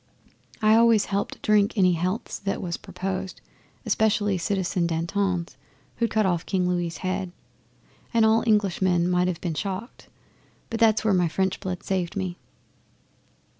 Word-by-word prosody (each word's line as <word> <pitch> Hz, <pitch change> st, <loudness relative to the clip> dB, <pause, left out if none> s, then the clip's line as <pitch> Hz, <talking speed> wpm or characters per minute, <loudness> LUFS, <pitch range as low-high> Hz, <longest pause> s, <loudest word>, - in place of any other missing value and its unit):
I 215 Hz, 0 st, +6 dB
always 225 Hz, -2 st, +5 dB
helped 200 Hz, 0 st, -3 dB
drink 210 Hz, +1 st, +3 dB
any 185 Hz, -2 st, +4 dB
healths 180 Hz, +6 st, -2 dB
that 195 Hz, 0 st, -2 dB
was 170 Hz, -2 st, -3 dB
proposed 190 Hz, 0 st, -5 dB, 0.5 s
specially 210 Hz, -2 st, +2 dB
Citizen 180 Hz, -1 st, -1 dB
Danton's 170 Hz, +2 st, -1 dB, 0.4 s
who'd 230 Hz, -1 st, +1 dB
cut 215 Hz, -1 st, +1 dB
off 175 Hz, -3 st, 0 dB
King 185 Hz, -2 st, 0 dB
Louis' 175 Hz, -2 st, -1 dB
head. 185 Hz, -1 st, -3 dB, 0.8 s
An 230 Hz, -2 st, +3 dB
all 220 Hz, +1 st, +4 dB
Englishman 190 Hz, -4 st, +2 dB
might 180 Hz, 0 st, +2 dB
have 175 Hz, -2 st, -3 dB
been 170 Hz, -3 st, -2 dB
shocked 195 Hz, -, -5 dB, 0.6 s
but 225 Hz, -, -2 dB
that's 220 Hz, -1 st, +3 dB
where 215 Hz, -, +3 dB
my 180 Hz, -2 st, +3 dB
French 190 Hz, +4 st, -1 dB
blood 185 Hz, -1 st, -5 dB
saved 185 Hz, -3 st, -2 dB
me. 185 Hz, -3 st, -3 dB
190 Hz, 145 wpm, -25 LUFS, 180-210 Hz, 0.8 s, I